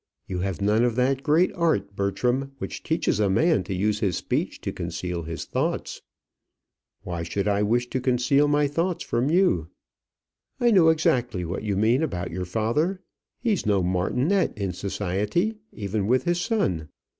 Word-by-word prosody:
You 90 - -4
have 95 +1 -3
none 105 +3 +3
of 120 -2 +1
that 130 +2 +1
great 160 +5 +3
art, 160 - 0
Bertram, 125 +7 -1
which 95 - -6
teaches - - 0
a 105 -2 +2
man 155 - +3
to 95 - -4
use 105 +3 0
his 95 -5 0
speech - - -2
to - - -3
conceal 85 +1 -4
his 85 0 -5
thoughts." - - -2 1.0
"Why 85 -2 -4
should 90 +5 -2
I 100 0 +2
wish 120 +4 +1
to 130 - -1
conceal 130 +3 +3
my 145 0 +3
thoughts 165 +5 -1
from 120 +4 0
you?" 160 - +3 0.9
"I 240 -1 +4
know 180 -6 +6
exactly 125 - +1
what 85 +3 -4
you 105 -3 -1
mean 115 +7 +3
about 90 - -2
your 90 +2 -3
father: 115 - 0 0.4
he 235 -2 +1
is 180 - -2
no 100 -3 +3
martinet 125 - +1
in 100 -3 -2
society, 105 - -1
even 100 -1 -2
with 130 +2 +3
his 175 +2 0
son. 95 - -1
110 Hz, 170 wpm, -25 LUFS, 95-150 Hz, 1.0 s, know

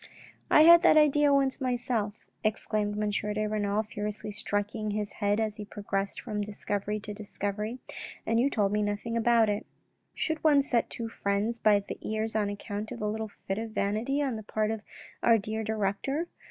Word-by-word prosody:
"I 305 - +7
had 340 +1 +9
that 340 - +6
idea 295 -1 +5
once 275 -1 +2
myself," 240 -4 -1 0.2
exclaimed 215 -1 0
M. 210 0 0
de 210 +1 -1
Renal, 210 0 0
furiously 210 -1 -5
striking 210 +1 -2
his 210 0 -2
head 205 0 0
as 215 -1 -1
he 210 - -5
progressed 200 -1 -3
from 210 -3 -3
discovery 205 0 -3
to 210 0 -6
discovery, 210 +2 -4 0.2
" - - -11
and 230 +1 +2
you 265 +4 +3
told 205 -6 +1
me 210 0 +1
nothing 205 +3 -2
about 230 -1 +4
it." 205 0 -2 0.3
" - - -47
Should 315 -1 -1
one 290 -3 +5
set 245 -4 +1
two 230 - -4
friends 210 +2 -1
by 210 -2 +5
the 200 - -7
ears 220 +1 -2
on 210 -2 +1
account 205 +1 -5
of 240 - -6
a 210 - -1
little 220 +1 -3 0.2
fit 195 +2 -1
of 225 -1 -5
vanity 220 +9 0
on 260 -5 -1
the - - -6
part 215 +1 -1
of 220 -1 -3 0.4
our 230 - +5
dear 220 +1 -3
director 220 - -1
215 Hz, 195 wpm, -29 LUFS, 205-230 Hz, 0.4 s, had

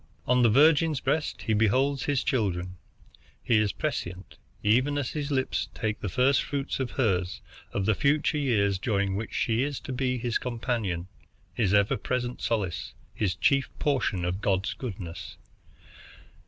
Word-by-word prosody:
On 125 0 +3
the 120 - +5
virgin's 150 +4 +4
breast 150 +4 -1
he 110 - 0
beholds 130 +6 +2
his 145 -3 +1
children. 90 -8 -1 0.7
He 115 -3 +3
is 105 -2 +1
prescient, 90 +2 -4 0.2
even 130 +7 +3
as 140 -3 -2
his 150 -2 -3
lips 130 -2 -1
take 110 -2 -2
the 105 - -3
first 130 +8 +3
fruits 140 -1 -3
of 130 -2 -1
hers, 95 -8 0 0.3
of 100 - -1
the 110 - +3
future 150 +5 +1
years 100 -8 +1
during 100 -3 0
which 110 +2 -4
she 115 +1 +1
is 140 0 -2
to 130 - -6
be 125 0 0
his 120 -1 -1
companion, 115 -8 -2 0.5
his 105 -5 +1
ever 100 0 +3
present 125 +3 -3
solace, 100 -8 -2 0.2
his 95 -5 -1
chief 135 -1 +2
portion 110 -11 0
of 90 +3 -2
God's 95 -2 0
goodness. 95 -8 -7
115 Hz, 155 wpm, -27 LUFS, 100-135 Hz, 0.7 s, the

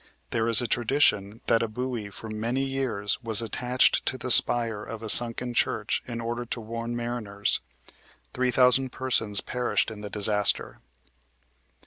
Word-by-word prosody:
There 115 -1 -1
is 115 +2 +6
a - - -2
tradition 115 -3 +1
that 115 - +2
a 115 - -1
buoy 120 -1 -5
for 105 +3 -10
many 115 +5 -2
years 130 -6 -2
was 110 -4 +1
attached 125 +3 +1
to 130 - -1
the 125 0 -4
spire 115 -3 +3
of 115 0 -8
a 110 - -5
sunken 120 +1 +4
church - - -1
in 120 -1 -5
order 120 +1 -4
to 120 0 -5
warn 115 +1 -6
mariners. 120 -4 -3 0.7
Three 125 0 0
thousand 125 +1 +5
persons 115 -6 +1
perished 125 -2 -2
in 105 -1 -10
the 105 - -7
disaster. 105 0 0
115 Hz, 155 wpm, -26 LUFS, 110-125 Hz, 0.7 s, is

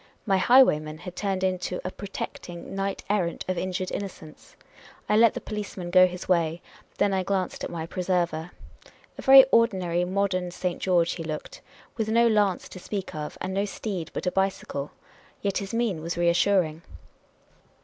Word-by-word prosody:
My 195 -3 +2
highwayman 155 -10 +4
had 180 +2 -9
turned 190 -1 -2
into 185 -1 -1
a 185 - -2
protecting 180 -3 -7
knight 195 0 -3
errant 185 -4 -1
of 185 - 0
injured 185 +1 -3
innocence. 170 -6 -8 0.5
I 210 - +2
let 225 0 +5
the - - -2
policeman 200 -4 -6
go 185 0 +7
his 180 0 -7
way; 170 -2 +1 0.4
then 205 -1 +2
I 190 - +1
glanced 185 -1 -2
at - - -3
my 165 -2 -4
preserver. 175 -2 -1 0.7
A - - -4
very 270 -1 +9
ordinary 185 -7 +2
modern 185 -1 0
St. 180 0 -3
George 175 -3 +2
he 165 - -5
looked, 155 -1 -6 0.4
with 220 -2 -1
no 235 +1 +4
lance 205 -4 +2
to 185 - -9
speak 195 +1 -5
of, 150 -1 -6
and 190 - -3
no 195 +1 +1
steed 195 -5 -5
but - - -5
a 180 - +1
bicycle. 190 -7 -2 0.5
Yet 200 -1 0
his 195 -1 -6
mien 230 -8 -1
was 170 +2 -4
reassuring. 170 -1 +2
185 Hz, 170 wpm, -26 LUFS, 175-200 Hz, 0.7 s, very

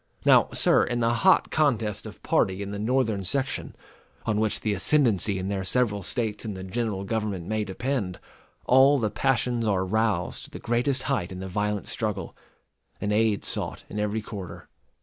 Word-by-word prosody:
Now, - - +6
sir, - - +4
in 120 0 -1
the 115 0 +2
hot 190 +10 +4
contest 115 -9 +1
of - - -12
party 95 +1 +1
in 100 - -6
the 100 - -4
Northern 110 -3 +1
section, 135 +8 -2 0.5
on 105 -2 +1
which 110 -1 0
the 110 - 0
ascendency 105 -3 +2
in 95 0 -3
their 100 -1 -2
several 105 0 +1
States 110 +2 -2
and 105 -4 -5
the 95 - -7
general 105 0 -2
government 105 -4 -2
may 110 +2 -1
depend, 105 -1 -3 0.5
all 135 +3 +6
the 110 -5 -1
passions 120 -3 0
are 95 -2 +1
roused 110 +2 0
to - - -13
the - - -8
greatest 125 +3 0
height 130 -11 -1
in 95 - -6
the 95 - -5
violent 105 0 -2
struggle, - - -3 0.6
and 105 - -1
aid 110 -1 +2
sought - - -3
in 105 - -4
every 105 +1 -1
quarter. 100 -4 -8
110 Hz, 180 wpm, -26 LUFS, 100-120 Hz, 0.6 s, Now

